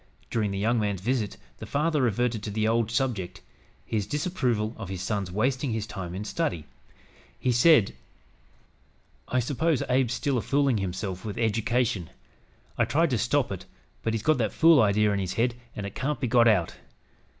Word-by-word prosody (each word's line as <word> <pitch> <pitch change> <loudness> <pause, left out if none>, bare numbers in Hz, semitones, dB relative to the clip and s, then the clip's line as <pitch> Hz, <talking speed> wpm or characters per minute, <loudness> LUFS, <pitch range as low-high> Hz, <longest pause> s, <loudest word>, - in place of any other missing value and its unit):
During 110 -3 0
the 100 - -3
young 115 +4 +1
man's 100 -3 -1
visit, 115 +1 -1 0.2
the - - -7
father 150 0 +1
reverted 120 -1 0
to 105 - -5
the 110 +1 0
old 115 0 +1
subject, 115 -6 -2 0.4
his 105 -3 -2
disapproval 130 - -1
of 105 -5 -7
his 95 -1 -4
son's 100 -3 -2
wasting 125 +5 0
his 110 -2 -2
time 90 -5 -6
in 100 +3 -5
study. 145 - -2 0.7
He 125 - 0
said: 120 -2 +5 1.3
"I 130 - +1
s'pose 145 +4 0
Abe's 125 -2 +1
still 135 -4 0
a - - -3
foolin' 140 -4 +1
hisself 95 0 -4
with 105 -2 -5
eddication. 115 -3 0 0.7
I - - +4
tried 155 +5 +1
to 120 - +1
stop 125 +2 +1
it, 95 - -6 0.3
but 115 0 -1
he's 110 - -3
got 155 -1 +3
that 110 -4 0
fool 165 -4 +6
idee 105 0 +3
in 100 -1 +1
his 95 -1 -2
head 120 +1 +1 0.2
an' 100 - -4
it 100 - -6
can't 145 +2 -2
be 125 - -1
got 120 0 +5
out. 95 -7 +2
115 Hz, 185 wpm, -27 LUFS, 105-130 Hz, 1.3 s, fool